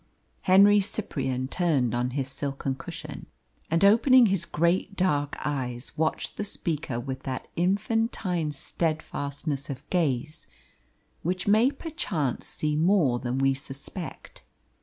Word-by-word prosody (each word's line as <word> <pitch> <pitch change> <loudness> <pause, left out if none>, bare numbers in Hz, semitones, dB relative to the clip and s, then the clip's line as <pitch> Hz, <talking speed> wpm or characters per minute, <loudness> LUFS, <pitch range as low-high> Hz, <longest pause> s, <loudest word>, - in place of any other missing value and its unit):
Henry 200 +2 +7
Cyprian 135 -10 -2
turned 140 -7 +1
on 120 +1 0
his 135 -2 -1
silken 140 0 -2
cushion, 130 - -8 0.4
and 165 +4 +3
opening 240 +4 +7
his 190 -5 +1
great 170 +5 +1
dark 145 -7 +1
eyes 125 -3 -3
watched 160 0 -1
the - - -1
speaker 155 -10 -3
with 130 +1 -5
that 130 -1 -5
infantine 190 -3 0
steadfastness 145 -2 -3
of 135 0 -7
gaze 150 -3 -1 0.7
which 180 +3 -2
may 220 +5 +5
perchance 240 - -3
see 150 -1 -1
more 160 -7 +3
than 125 0 -2
we 135 0 +3
suspect. 140 +5 -8
155 Hz, 120 wpm, -27 LUFS, 135-190 Hz, 0.7 s, Henry